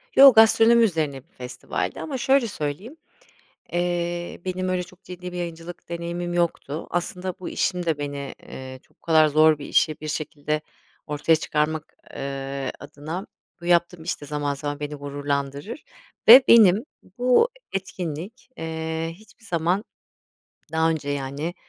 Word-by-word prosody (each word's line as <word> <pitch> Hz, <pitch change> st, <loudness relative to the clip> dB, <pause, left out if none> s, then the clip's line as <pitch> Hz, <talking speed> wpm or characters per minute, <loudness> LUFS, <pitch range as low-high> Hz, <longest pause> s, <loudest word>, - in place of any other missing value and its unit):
Yo, 275 Hz, -1 st, +10 dB
gastronomi 225 Hz, +1 st, +6 dB
üzerine 160 Hz, -9 st, 0 dB
bir 165 Hz, -, -38 dB
festivaldi, 125 Hz, 0 st, -4 dB
ama 280 Hz, -4 st, -4 dB
şöyle 265 Hz, 0 st, +3 dB
söyleyeyim, 190 Hz, -, -5 dB, 0.8 s
eee, 175 Hz, 0 st, -2 dB
benim, 185 Hz, 0 st, -2 dB
öyle 180 Hz, -1 st, 0 dB
çok 185 Hz, +2 st, -17 dB
ciddi 180 Hz, 0 st, -8 dB
bir 180 Hz, -, -6 dB
yayıncılık 170 Hz, 0 st, -7 dB
deneyimim 170 Hz, +1 st, -4 dB
yoktu. 170 Hz, -3 st, -1 dB
Aslında, 180 Hz, +1 st, -3 dB
bu 185 Hz, -, -5 dB
işim 180 Hz, -1 st, -1 dB
de, 160 Hz, -3 st, +1 dB
beni, 140 Hz, -1 st, -5 dB
eee, 130 Hz, 0 st, -9 dB
çok -, -, -32 dB
bu -, -, -70 dB
kadar 160 Hz, -2 st, +5 dB
zor 155 Hz, +1 st, +5 dB
bir 140 Hz, -, -7 dB
işi, 155 Hz, -, +2 dB
bir 155 Hz, -, -5 dB
şekilde 150 Hz, 0 st, -3 dB, 0.5 s
ortaya 150 Hz, +2 st, +2 dB
çıkarmak, 155 Hz, 0 st, -2 dB, 0.2 s
eee, 135 Hz, 0 st, -4 dB
adına, 160 Hz, +6 st, -7 dB, 0.4 s
bu -, -, -9 dB
yaptığım 175 Hz, -1 st, +2 dB
iş 170 Hz, -, -3 dB
de, -, -, -7 dB
zaman, 145 Hz, 0 st, -2 dB
zaman, 145 Hz, +1 st, -4 dB
beni 150 Hz, 0 st, -4 dB
gururlandırır, 145 Hz, -, -4 dB, 0.4 s
ve 255 Hz, +4 st, +11 dB
benim, 215 Hz, -2 st, +7 dB, 0.3 s
bu 250 Hz, -, +4 dB, 0.2 s
etkinlik, 190 Hz, -, -5 dB
eee, 160 Hz, 0 st, -3 dB
hiçbir 215 Hz, +3 st, -20 dB
zaman, 175 Hz, +2 st, 0 dB, 0.9 s
daha 160 Hz, 0 st, +3 dB
önce, 155 Hz, -3 st, -3 dB
yani, 145 Hz, +4 st, -3 dB
165 Hz, 145 wpm, -24 LUFS, 145-185 Hz, 0.9 s, ve